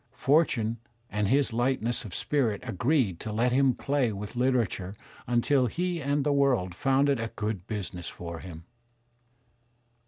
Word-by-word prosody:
Fortune 120 Hz, -7 st, +2 dB, 0.3 s
and 105 Hz, 0 st, 0 dB
his 135 Hz, +1 st, +2 dB
lightness 120 Hz, 0 st, 0 dB
of 100 Hz, -, -7 dB
spirit 120 Hz, -9 st, 0 dB
agreed 120 Hz, -, +1 dB
to 110 Hz, -, -5 dB
let 115 Hz, +4 st, +1 dB
him 130 Hz, -1 st, +3 dB
play 140 Hz, -4 st, 0 dB
with 105 Hz, +3 st, -7 dB
litera 125 Hz, -1 st, +3 dB
ture 95 Hz, +1 st, -6 dB, 0.3 s
until 125 Hz, +2 st, +2 dB
he 175 Hz, +3 st, -2 dB
and 140 Hz, 0 st, 0 dB
the 145 Hz, 0 st, +2 dB
world 130 Hz, -11 st, +2 dB
found 135 Hz, +7 st, +2 dB
it 140 Hz, -3 st, +2 dB
a 115 Hz, 0 st, -3 dB
good 105 Hz, -3 st, -3 dB
business 90 Hz, -5 st, -4 dB
for 85 Hz, -1 st, -7 dB
him. 85 Hz, -2 st, -9 dB
120 Hz, 155 wpm, -28 LUFS, 105-135 Hz, 0.3 s, him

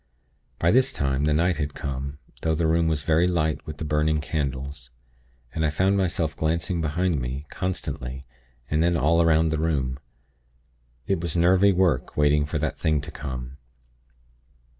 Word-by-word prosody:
"By 85 Hz, -, +3 dB
this 130 Hz, +3 st, +4 dB
time, 70 Hz, -, 0 dB
the 75 Hz, -, +2 dB
night 85 Hz, +1 st, +2 dB
had 75 Hz, -1 st, -3 dB
come; 70 Hz, +1 st, -4 dB, 0.2 s
though 80 Hz, -1 st, +1 dB
the 80 Hz, +1 st, 0 dB
room 80 Hz, +1 st, +2 dB
was 80 Hz, -3 st, 0 dB
very 80 Hz, +3 st, +3 dB
light 80 Hz, -4 st, 0 dB
with 75 Hz, -1 st, -6 dB
the 80 Hz, -, -4 dB
burning 75 Hz, +1 st, +1 dB
candles; 70 Hz, -3 st, -4 dB, 0.6 s
and 80 Hz, -, -1 dB
I 80 Hz, -, +3 dB
found 95 Hz, +6 st, +2 dB
myself 85 Hz, -5 st, 0 dB
glancing 85 Hz, +3 st, -1 dB
behind 80 Hz, +1 st, 0 dB
me, 65 Hz, +4 st, -4 dB
constantly, 65 Hz, -8 st, -4 dB, 0.4 s
and 75 Hz, +2 st, +1 dB
then 85 Hz, 0 st, +2 dB
all 85 Hz, +2 st, +3 dB
'round 80 Hz, -1 st, +3 dB
the 80 Hz, -, -1 dB
room. 70 Hz, -5 st, -1 dB, 1.1 s
It 95 Hz, -4 st, 0 dB
was 85 Hz, 0 st, -2 dB
nervy 95 Hz, +4 st, +5 dB
work 90 Hz, -9 st, +1 dB
waiting 75 Hz, 0 st, +3 dB
for 75 Hz, -, -2 dB
that 75 Hz, 0 st, -2 dB
thing 80 Hz, -2 st, +2 dB
to 75 Hz, +3 st, -7 dB
come. 65 Hz, -3 st, -6 dB
80 Hz, 165 wpm, -25 LUFS, 70-85 Hz, 1.1 s, nervy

